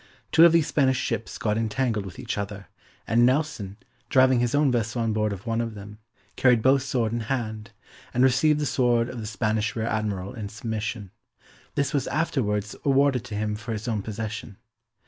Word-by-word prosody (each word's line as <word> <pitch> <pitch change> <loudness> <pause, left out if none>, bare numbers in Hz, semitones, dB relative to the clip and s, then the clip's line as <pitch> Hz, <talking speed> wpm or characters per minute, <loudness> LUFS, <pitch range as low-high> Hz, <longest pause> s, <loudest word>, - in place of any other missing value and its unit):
Two 160 +1 +8
of 170 - +7
these 165 -2 +4
Spanish 135 -4 +2
ships 115 -4 -3
got 105 0 0
entangled 110 -2 -1
with 90 - -10
each - - -4
other, 100 0 -5 0.4
and 115 +1 +3
Nelson, 125 -7 0 0.3
driving 130 -1 +5
his 120 +2 +1
own 145 -2 +3
vessel 120 0 -1
on 110 -1 0
board 110 0 0
of 100 +3 -7
one 115 0 0
of 115 -2 -4
them, 105 +1 -10 0.4
carried 125 -4 +4
both 135 +1 +5
sword 125 -4 -1
in 120 - -1
hand, 110 -2 -3 0.4
and 125 - +2
received 140 +4 +4
the 150 - 0
sword 120 -3 +2
of 125 - -6
the 110 - -5
Spanish 105 0 -1
Rear 110 -1 -1
Admiral 105 -4 -2
in 105 -5 -6
submission; 110 -2 -4 0.6
this 140 - 0
was 140 - 0
afterwards 105 -10 -1
awarded 135 -3 +3
to 110 -4 -6
him 105 0 -1
for 110 +2 -5
his 110 +2 -5
own 110 -3 -1
possession. 110 -1 -6
115 Hz, 190 wpm, -25 LUFS, 105-130 Hz, 0.6 s, Two